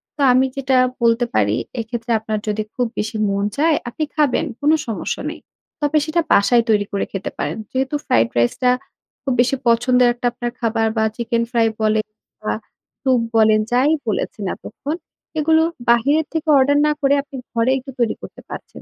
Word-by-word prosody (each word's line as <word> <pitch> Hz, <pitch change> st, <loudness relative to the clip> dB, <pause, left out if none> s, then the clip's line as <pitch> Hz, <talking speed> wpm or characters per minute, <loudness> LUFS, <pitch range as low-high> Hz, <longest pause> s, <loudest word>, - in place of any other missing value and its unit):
তো 295 Hz, -, -5 dB
আমি 255 Hz, +1 st, +4 dB
যেটা 265 Hz, -1 st, +2 dB, 0.3 s
বলতে 230 Hz, +1 st, +3 dB
পারি 105 Hz, 0 st, +3 dB, 0.3 s
এক্ষেত্রে 235 Hz, +1 st, -5 dB
আপনার 215 Hz, 0 st, -3 dB
যদি 215 Hz, +1 st, -1 dB
খুব 245 Hz, -, +1 dB
বেশি 215 Hz, +1 st, -2 dB
মন 200 Hz, 0 st, 0 dB
চায় 315 Hz, +2 st, +3 dB
আপনি 310 Hz, +6 st, -3 dB
খাবেন 300 Hz, 0 st, +2 dB, 0.2 s
কোন 295 Hz, -, +4 dB, 0.2 s
সমস্যা 225 Hz, -, -3 dB
নেই, -, -, -8 dB, 0.4 s
তবে 295 Hz, +1 st, +2 dB
সেটা 330 Hz, +2 st, +1 dB
বাসায় 235 Hz, +4 st, +5 dB
তৈরি 210 Hz, -2 st, +3 dB
করে 200 Hz, -, -1 dB
খেতে 195 Hz, -1 st, -4 dB
পারেন। 145 Hz, +2 st, -2 dB
যেহেতু 265 Hz, +2 st, -1 dB
ফ্রাইড 115 Hz, 0 st, +3 dB
রাইস 120 Hz, 0 st, +3 dB
টা 250 Hz, -, +5 dB, 0.5 s
খুব 270 Hz, -, 0 dB
বেশি 250 Hz, +2 st, +1 dB
পছন্দের 245 Hz, +2 st, +4 dB
একটা 245 Hz, 0 st, -2 dB
আপনার 240 Hz, 0 st, -4 dB
খাবার 225 Hz, -1 st, +1 dB
বা 220 Hz, -, +3 dB
চিকেন 235 Hz, 0 st, -1 dB
ফ্রাই 230 Hz, -2 st, +3 dB
বলেন 215 Hz, 0 st, +2 dB, 0.4 s
বা -, -, -1 dB, 0.5 s
সুপ 260 Hz, -2 st, +3 dB, 0.2 s
বলেন 215 Hz, -1 st, +5 dB
যাই 260 Hz, +5 st, +3 dB, 0.2 s
বলেছেন 210 Hz, -1 st, -2 dB
এতক্ষণ। 295 Hz, +3 st, -6 dB, 0.4 s
এগুলো 320 Hz, +1 st, +4 dB, 0.3 s
বাহিরের 280 Hz, +7 st, +3 dB
থেকে 320 Hz, 0 st, -2 dB
অর্ডার 280 Hz, +2 st, +4 dB
না -, -, +3 dB
করে 275 Hz, 0 st, +3 dB
আপনি 280 Hz, -, -12 dB, 0.2 s
ঘরে 230 Hz, +2 st, +2 dB
একটু 270 Hz, +1 st, -8 dB
তৈরি 235 Hz, -2 st, +1 dB
করতে -, -, -10 dB
পারছেন। -, -, -9 dB
240 Hz, 180 wpm, -20 LUFS, 220-275 Hz, 0.5 s, বাসায়